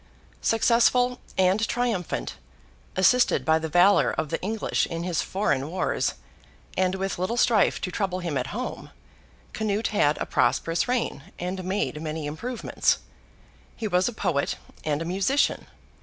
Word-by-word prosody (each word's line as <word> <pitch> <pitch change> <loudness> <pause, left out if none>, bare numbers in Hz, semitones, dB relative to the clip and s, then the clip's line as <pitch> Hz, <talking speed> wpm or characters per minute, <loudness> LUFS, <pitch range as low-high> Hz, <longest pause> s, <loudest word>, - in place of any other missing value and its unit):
Successful 240 +2 +3 0.2
and 190 +4 +3
triumphant, 235 -8 -1 0.6
assisted 245 +7 +4
by 160 0 +4
the 160 0 -4
valour 180 +5 +5
of 155 -2 -2
the 165 - -2
English 215 +3 -1
in 165 0 -4
his 175 -2 0
foreign 150 -8 -1
wars, 185 +3 -1 0.6
and 185 0 +1
with 190 -1 -3
little 185 +7 -1
strife 225 -4 +3
to 180 - -4
trouble 185 -1 -1
him 170 -5 -3
at 130 -1 -1
home, - - -5 0.6
Canute 215 0 -1
had 155 -8 +2
a - - -2
prosperous 165 +6 +1
reign, 240 - -1
and 185 +1 -4
made 185 -4 -2
many 155 -1 -4
improvements. 230 +12 -1 0.8
He 220 - -3
was 180 -1 +2
a - - -1
poet 140 -9 0 0.3
and 150 +1 -1
a - - -7
musician. 195 +11 +1
185 Hz, 145 wpm, -26 LUFS, 165-220 Hz, 0.8 s, valour